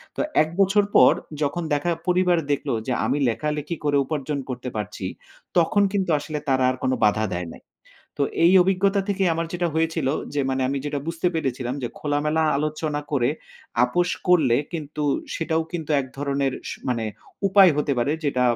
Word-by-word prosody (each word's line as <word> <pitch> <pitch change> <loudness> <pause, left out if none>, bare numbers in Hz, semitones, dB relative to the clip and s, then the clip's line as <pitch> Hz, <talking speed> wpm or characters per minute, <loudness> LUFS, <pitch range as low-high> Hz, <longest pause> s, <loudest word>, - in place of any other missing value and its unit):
তো - - -1 0.2
১ 155 - -5
বছর 195 +1 +4
পর - - +8 0.3
যখন 160 +4 -1
দেখা 145 +4 0 0.2
পরিবার 180 -1 +3
দেখলো 140 - -1
যে 125 - +1
আমি 145 - +1
লেখালেখি 150 +7 -2
করে 145 -1 +3
উপার্জন 145 -2 -3
করতে 125 0 -4
পারছি 105 -2 -4 0.5
তখন 200 +4 +4
কিন্তু 190 -3 0
আসলে 150 +1 -4
তারা 130 -1 +3
আর 130 - -1
কোন 130 - +2
বাধা 110 +1 +2
দেয় 90 -1 -4
নাই। - - -15 0.6
তো - - +2 0.2
এই 175 - +6
অভিজ্ঞতা 195 +2 +2
থেকেই 195 -2 +1
আমার 165 0 -2
যেটা 175 -1 0
হয়েছিল। 160 -3 0 0.3
যে 145 - +1
মানে 130 0 0
আমি 140 0 -1
যেটা 145 -1 -2
বুঝতে 165 +1 -2
পেরেছিলাম 130 -4 -2
যে 120 - -1
খোলামেলা 150 +2 0
আলোচনা 150 0 -2
করে 130 -1 +2 0.5
আপস 175 +8 +1 0.2
করলে 145 -10 +5 0.2
কিন্তু 150 -2 -5 0.3
সেটাও 160 0 0
কিন্তু 160 -3 -5
এক 130 - -5
ধরনের 140 -1 0 0.2
স - - -3 0.2
মানে 115 -3 0 0.4
উপায় 190 -2 +7
হতে 145 -1 0
পারে 140 +5 +1
যেটা 130 -3 +1
150 Hz, 175 wpm, -23 LUFS, 135-170 Hz, 0.6 s, পর